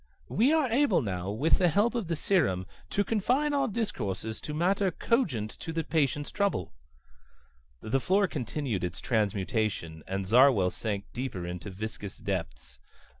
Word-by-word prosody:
We 245 +8 +3
are 315 -4 +3
able 235 - +3
now, 95 -3 -3
with 135 +11 +2
the 180 - +4
help 205 +7 +3
of 235 -7 -2
the 165 - 0
serum, 140 - +1 0.2
to 205 - +1
confine 250 +8 +1
our 275 -2 +2
discourses 110 - -3
to 150 - -5
matters 185 +3 +2
cogent 140 - +1
to 165 - -5
the 165 0 -1
patient's 145 -2 0
trouble." 200 - -1 1.1
The 125 +5 0
floor 195 +7 +3
continued 125 - -3
its 90 -1 -3
transmutation, 105 -6 -1
and 95 +1 -2
Zarwell 115 -4 +5
sank 100 -3 -3
deep 130 -1 -4
into 90 +2 -5
viscous 100 0 -6
depths. 80 -11 -5
125 Hz, 150 wpm, -29 LUFS, -, 1.1 s, Zarwell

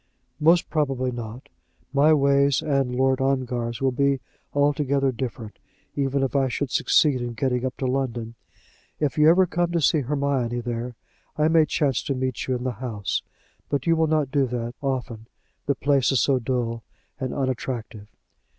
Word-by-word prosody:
"Most 165 +3 +4
probably 135 -5 0
not. 120 +3 -7 0.5
My 145 +3 +5
ways 140 -1 +3
and 135 -5 0
Lord 130 +1 +2
Ongar's 125 -3 -1
will 135 - +3
be 140 +1 +1 0.3
altogether 140 -1 +1
different, 115 -3 -6 0.4
even 140 0 0
if 135 - -2
I 135 -1 +3
should 130 +2 -3
succeed 140 -5 +3
in 120 -1 -4
getting 125 0 0
up 130 0 -3
to 135 - -3
London. 125 -3 -2 0.7
If 150 0 -1
you 150 +1 +7
ever 185 +3 +5
come 175 0 -1
to 170 - +2
see 155 +1 +3
Hermione 135 -3 -1
here, 120 0 -4 0.4
I 155 +1 +3
may 160 -1 +4
chance 140 -6 +1
to 140 - -1
meet 130 -2 -3
you 130 - 0
in 125 - -4
the 130 - -1
house. 105 -6 -2 0.5
But 140 -2 -1
you 165 - +4
will 160 0 +2
not 155 -3 +1
do 140 -2 +2
that 120 -1 -4
often, 125 -5 -3 0.4
the 140 - +2
place 140 -2 +2
is 135 - +2
so 135 -2 +2
dull 115 -1 -2 0.4
and 130 -2 -3
unattractive." 120 -5 -4
135 Hz, 170 wpm, -24 LUFS, 125-145 Hz, 0.7 s, you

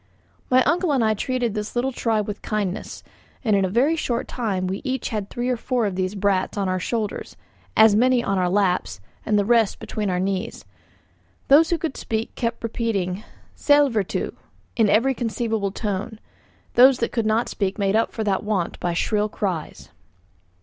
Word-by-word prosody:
My 255 0 +5
uncle 350 -1 +1
and 260 -4 +2
I 220 - +3
treated 245 0 -1
this 210 +1 -5
little 255 +2 0
tribe 225 -4 0
with 205 -1 -5
kindness; 205 -3 -3 0.4
and 215 -4 +2
in 195 - +2
a 190 - 0
very 260 - +2
short 245 -7 -2
time 200 -7 -2
we 190 +1 -3
each 265 -2 -2
had 210 -3 -3
three 245 +1 -3
or 250 -1 0
four 245 -1 -1
of 200 - -1
these 185 +2 -2
brats 195 0 0
on 200 -1 0
our 185 0 0
shoulders, 215 +2 -3 0.4
as 220 -1 +7
many 250 +2 +3
on 195 -1 0
our 180 -1 +1
laps, 180 - 0 0.3
and 210 - +3
the 205 - +2
rest 230 -2 +3
between 210 -2 -3
our 180 -1 0
knees. 190 - -3 0.8
Those 310 +4 +6
who 340 - +1
could 320 -4 -4
speak 220 0 -3
kept 230 -1 -3
repeating 215 -5 -2 0.3
"Sællvertu," 280 -9 +2 0.4
in 220 -3 +3
every 235 +6 +3
conceivable 225 -4 -2
tone; 210 +1 -4 0.5
those 255 +1 +7
that 235 - -1
could 230 -3 -1
not 220 +2 +1
speak 195 0 -2
made 200 -1 +1
up 225 - +2
for 220 - -3
that 195 -3 0
want 205 -5 -2
by 175 -1 -1
shrill 210 +4 0
cries. 185 -7 -4
215 Hz, 185 wpm, -23 LUFS, 195-240 Hz, 0.8 s, as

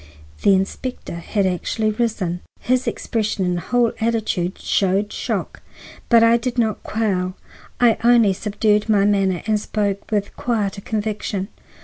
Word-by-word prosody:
The 200 - +5
inspector 195 +6 -3
had 195 +4 -1
actually 215 +4 0
risen. 210 -6 -1 0.2
His 255 +1 0
expression 215 -4 -1
and 175 -1 0
whole 240 +5 +1
attitude 220 -5 0
showed 195 +2 0
shock. - - -3 0.5
But 230 -2 +6
I 230 +1 +6
did 245 +1 -3
not 220 -3 +1
quail; 190 -4 -1 0.4
I 235 -3 +4
only 235 -4 +5
subdued 210 +2 0
my 200 -2 +4
manner 195 -3 +1
and 215 -1 +1
spoke 205 -2 -2
with 205 -2 -1
quieter 210 -5 -1
conviction. 210 -2 -3
210 Hz, 135 wpm, -21 LUFS, 195-230 Hz, 0.5 s, But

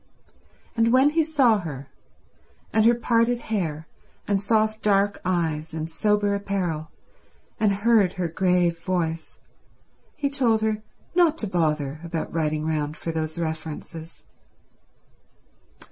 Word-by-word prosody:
And 230 0 +3
when 265 +3 +5
he 325 +1 +3
saw 275 -9 +3
her, 145 -6 -7 0.8
and 220 0 +4
her 235 +1 +6
parted 235 0 +2
hair 170 -10 -3 0.4
and 200 -1 +1
soft 215 +1 +1
dark 200 -1 +2
eyes 160 -3 -1
and 160 +1 -4
sober 205 +3 +1
apparel, 185 -6 -2 0.7
and 215 -2 +3
heard 205 -2 +3
her 180 -2 -2
grave 175 0 +1
voice, 165 -3 -2 0.8
he 285 - -1
told 250 -6 +1
her 215 -1 0 0.3
not 340 -3 +4
to 215 - -3
bother 155 -5 -1
about 165 -1 -4
writing 155 -1 -1
round 155 -1 -2
for 165 - -4
those 160 0 -3
references. 160 0 -6
185 Hz, 125 wpm, -24 LUFS, 160-220 Hz, 0.8 s, her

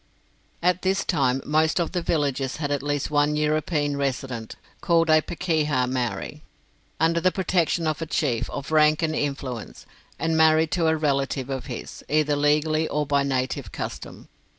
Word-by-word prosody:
At 180 0 +2
this 190 +1 0
time 135 -6 +1
most 155 +3 +2
of 170 - -1
the 180 - -1
villages 140 -5 -1
had 145 -2 -3
at 145 - 0
least 145 0 -2
one 145 0 +2
European 150 -1 0
resident 130 -4 -3 0.3
called 165 -1 +3
a 155 0 +6
Pakeha 155 -6 0
Maori, 125 -2 -3 0.6
under 165 +1 +2
the 185 - +3
protection 180 -3 0
of 155 0 -1
a 165 - -3
chief 130 -7 -1
of 140 +2 -6
rank 155 0 +4
and 155 -1 0
influence, 135 -6 -4 0.3
and 160 +1 0
married 160 0 +4
to 170 -1 +1
a 160 0 +2
relative 140 -3 -1
of 130 -1 -4
his, 120 -4 -7
either 150 -1 +2
legally 150 +2 +2
or 150 0 -1
by 140 0 +2
native 130 -2 -2
custom. - - -7
150 Hz, 165 wpm, -24 LUFS, 140-160 Hz, 0.6 s, a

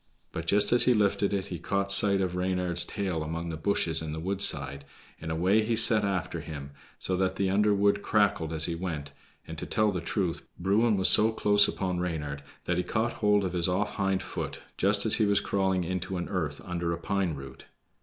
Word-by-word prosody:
But 80 0 -6
just 105 +6 +3
as 120 - +6
he 125 - +4
lifted 100 -1 +1
it 100 -2 -2
he 85 - -5
caught 100 +2 -1
sight 100 0 +5
of 90 -1 -2
Reynard's 90 -1 0
tail 95 -6 -3
among 80 +2 -4
the 80 - -4
bushes 80 -1 0
by 80 - -5
the 80 +1 -5
woodside, 70 -7 -1 0.4
and 80 - -7
away 90 +7 +2
he 115 +1 -1
set 115 0 +5
after 90 -4 -2
him, 75 -3 -8 0.3
so 95 - -2
that 95 0 0
the 95 -1 0
underwood 100 0 +2
crackled 100 -7 +1
as 80 -1 +2
he 85 - -2
went, 80 -5 -5 0.4
and, 80 0 -7
to - - -6
tell 110 -2 +1
the 90 -3 -4
truth, 85 0 -3
Bruin 105 +4 +2
was 95 - +4
so 110 +1 +5
close 105 -2 +3
upon 90 -2 -3
Reynard 75 -5 -4 0.2
that 90 - -1
he 90 - 0
caught 115 +4 -1
hold 105 -1 +2
of 90 - -3
his 85 -1 +2
off 100 +3 -2
hind 95 -1 0
foot - - -6
just - - +3
as - - +3
he 110 - +2
was 100 0 +3
crawling 95 -2 0
into 95 +1 -4
an 90 - -5
earth 80 -7 -3
under 85 -1 -3
a - - -4
pine 95 -1 -2
root. 70 -1 -11
95 Hz, 215 wpm, -28 LUFS, 85-100 Hz, 0.4 s, as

